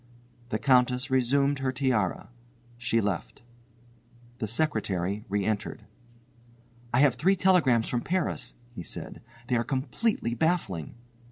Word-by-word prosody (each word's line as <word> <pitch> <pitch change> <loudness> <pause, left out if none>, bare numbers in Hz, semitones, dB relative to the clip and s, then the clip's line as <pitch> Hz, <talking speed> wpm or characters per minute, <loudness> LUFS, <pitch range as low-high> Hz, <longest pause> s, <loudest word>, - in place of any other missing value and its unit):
The 110 - 0
Countess 125 +1 +3
resumed 140 +2 +2
her 135 -1 0
tiara. 125 -9 0 0.5
She 115 -1 +1
left. 100 +1 -3 1.0
The 110 - -2
secretary 105 - -1
re 100 0 0
entered. 105 -1 -2 1.1
"I 120 - +4
have 140 -4 +5
three 170 +11 +2
telegrams 165 - +3
from 120 - -1
Paris," 170 -8 -2 0.2
he 110 - -6
said, 85 - -7 0.2
"they 125 - 0
are 115 - +1
completely 130 - -1
baffling." 115 - -1
125 Hz, 120 wpm, -28 LUFS, 110-140 Hz, 1.1 s, have